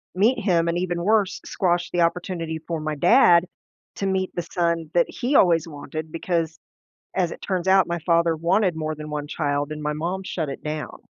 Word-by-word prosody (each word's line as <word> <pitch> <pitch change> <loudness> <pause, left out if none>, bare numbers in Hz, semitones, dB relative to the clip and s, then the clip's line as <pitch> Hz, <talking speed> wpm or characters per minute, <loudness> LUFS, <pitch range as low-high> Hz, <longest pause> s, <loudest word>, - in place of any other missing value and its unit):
meet 230 +6 +3
him, 170 -4 +2
and 170 - 0
even 175 -1 -2
worse, 210 -1 +2
squash 175 -2 0
the 175 - +1
opportunity 170 -1 -1
for 165 +1 -4
my 155 0 -3
dad 175 - +5 0.5
to 195 - -3
meet 190 -1 0
the 175 - -1
son 170 -2 -1
that 170 -1 +3
he 260 +4 -2
always 170 - +4
wanted, 155 +1 -7
because, 165 -1 -2 0.6
as 175 -3 +1
it - - -9
turns 185 -2 -2
out, 190 -1 +5
my 170 0 -2
father 170 0 +2
wanted 175 +3 +1
more 155 0 -2
than 150 0 -8
1 150 -1 -4
child 145 -1 -1
and 150 0 -5
my 150 0 -1
mom 175 +5 -3
shut 160 -5 -3
it 135 - -7
down. 155 0 -5
170 Hz, 200 wpm, -23 LUFS, 155-185 Hz, 0.6 s, dad